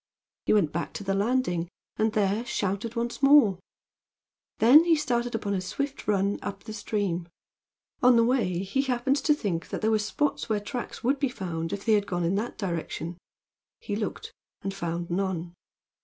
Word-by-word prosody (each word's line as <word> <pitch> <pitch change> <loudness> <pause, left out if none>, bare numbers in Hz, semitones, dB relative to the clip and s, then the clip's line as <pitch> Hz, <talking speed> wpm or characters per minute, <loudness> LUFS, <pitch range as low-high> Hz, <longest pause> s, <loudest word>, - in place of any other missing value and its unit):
He - - +4
went 190 -8 +3
back 170 +1 -3
to - - -6
the 195 0 0
landing, 200 -5 0 0.3
and 215 0 +1
there 210 +1 +1
shouted 210 0 -2
once 235 +2 -3
more. 275 -10 +6 1.0
Then 265 +8 +8
he 335 -1 +4
started 245 -6 -1
upon 205 -2 -2
a 190 - 0
swift 280 +9 -4
run 200 -1 +1
up 200 -1 -6
the 215 - -7
stream. 200 -5 -2 0.7
On 250 0 +6
the 230 - +5
way 230 -8 +1
he 200 +8 0
happened 265 +1 +1
to 295 +1 +3
think 185 - -3
that - - -4
there 220 0 +2
were 215 - +3
spots 290 +8 -1
where 215 -1 +1
tracks 240 +4 -6
would 270 +4 +2
be 275 -2 +1
found 170 -7 -4
if 200 0 -5
they 225 - +4
had 205 -1 +2
gone 175 -1 -1
in 170 +2 +1
that 215 +5 -2
direction. 170 -2 -4 0.6
He 205 - -4
looked, 210 0 -4 0.3
and 195 - -2
found 170 -2 -4
none. 175 -2 -2
205 Hz, 185 wpm, -27 LUFS, 185-240 Hz, 1.0 s, Then